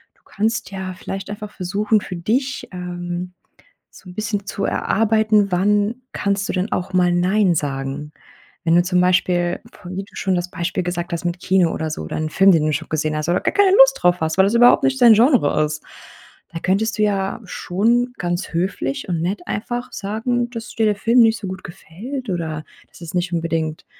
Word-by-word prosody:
du - - -34
kannst 220 0 -2
ja 190 -1 -5
vielleicht 195 +2 -6
einfach 210 0 -7
versuchen, 205 +3 0
für 185 - -6
dich, 255 +10 -1
ähm, 180 0 -5 0.6
so - - -16
'n - - -12
bisschen 210 -1 -3
zu 200 0 -3
erarbeiten, 215 -1 +2
wann 205 +6 +1
kannst 200 0 -1
du - - -1
denn 185 +3 -2
auch 185 +2 -2
mal 180 -1 +3
nein 185 +1 +2
sagen? 140 0 -3 0.5
Wenn 165 0 +3
du 175 - +5
zum 180 0 +1
Beispiel, 175 -1 +1
f - - -16
wie 185 +2 -5
du - - -23
schon 190 -1 0
das 175 0 -2
Beispiel 175 +1 -2
gesagt 175 0 -4
hast 170 - -5
mit 175 +1 -2
Kino 185 -3 +2
oder 160 0 -3
so, 155 - -4
oder 80 - -5
'n 155 0 -2
Film, 195 +4 +5
den 155 -3 +3
du 155 - +1
schon - - -3
gesehen 155 0 -1
hast 155 +1 -3
oder 175 - +2
gar - - -1
keine 400 -1 +5
Lust 270 0 +7
drauf 180 0 +3
hast, 160 +2 -1
weil 190 - +7
das 200 +4 +1
überhaupt 245 +3 +6
nicht 270 -1 +1
dein 235 -2 +9
Genre 225 - +3
ist. 155 0 -4 0.7
Da 165 - -4
könntest 215 +5 0
du - - +2
ja 195 -1 0
schon 235 +7 0
ganz 175 +1 -3
höflich 190 - -2
und 170 -3 -1
nett 185 +4 -2
einfach 240 +4 -4
sagen, 235 +4 -2
dass 230 0 -7
dir 225 - +1
der 210 -1 +2
Film 230 +4 +3
nicht 225 -1 +4
so 205 - -7
gut 190 0 -7
gefällt, 215 - -8
oder 160 -4 -3 0.2
das - - -18
es 165 0 -8
nicht 175 0 -1
unbedingt 165 -2 -2
190 Hz, 210 wpm, -20 LUFS, 175-215 Hz, 0.7 s, dein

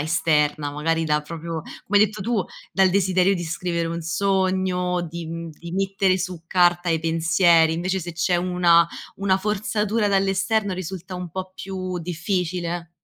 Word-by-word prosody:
esterna, 150 -1 +1
magari 165 +3 0
da 150 -1 +1
proprio, 165 +1 -6 0.2
come 205 +1 +4
hai 210 - +7
detto 210 +1 -9
tu, 230 0 0 0.3
dal 190 -1 +4
desiderio 190 0 +3
di 175 - -3
scrivere 170 +1 -2
un 170 0 -4
sogno 185 0 0
di, 170 +1 -6
mhmm 165 0 -6
di 170 0 -8
mettere 195 0 +1
su 180 -2 -4
carta 175 0 +3
i 160 -1 +1
pensieri, 165 0 +3
invece 180 +3 -1
se 175 0 -6
c'è 175 +2 +1
una 175 -1 +4 0.3
una 195 -1 +1
forzatura 210 +1 0
dall'esterno 195 +1 +1
risulta 185 0 -6
un 180 -1 -6
po' 185 +2 -6
più 185 -2 -5
difficile. 175 -1 -3
180 Hz, 155 wpm, -23 LUFS, 165-190 Hz, 0.3 s, hai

